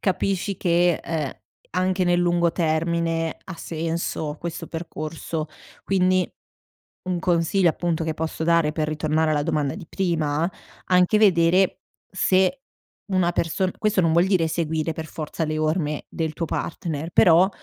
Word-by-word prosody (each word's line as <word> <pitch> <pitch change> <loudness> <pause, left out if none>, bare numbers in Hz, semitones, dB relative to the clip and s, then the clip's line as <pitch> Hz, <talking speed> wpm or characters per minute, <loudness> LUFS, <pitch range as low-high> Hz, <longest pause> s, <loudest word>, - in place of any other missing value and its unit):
capisci 195 0 0
che, 175 -1 +3
ehm, 155 -5 -2 0.4
anche 185 +1 0
nel 175 0 +3
lungo 175 -1 +2
termine 165 0 0
ha 185 - -7
senso 160 -2 -3
questo 170 0 -5
percorso. 160 -1 -5 0.4
Quindi, 185 -1 +2 0.8
un 180 -1 -1
consiglio 175 +1 +2
appunto 170 0 -2
che 160 - -2
posso 160 0 -4
dare 170 -2 +3
per 155 -1 -1
ritornare 155 +1 0
alla 145 -1 +1
domanda 145 -3 0
di 180 -6 -9
prima, 165 -3 0 0.4
anche 180 +3 +4
vedere, 185 -2 +4 0.3
se 190 +7 +2 0.5
una 180 -2 +3
person 175 +3 0
questo 215 -2 +2
non 165 -2 +2
vuol 170 +2 +4
dire 180 -4 +2
seguire 160 -1 -1
per 160 0 -6
forza 155 +1 -4
le 155 0 -2
orme 155 -1 -1
del 160 -2 -3
tuo 165 - -3
partner 160 -1 -4
però, 180 0 +6
170 Hz, 145 wpm, -23 LUFS, 160-180 Hz, 0.8 s, però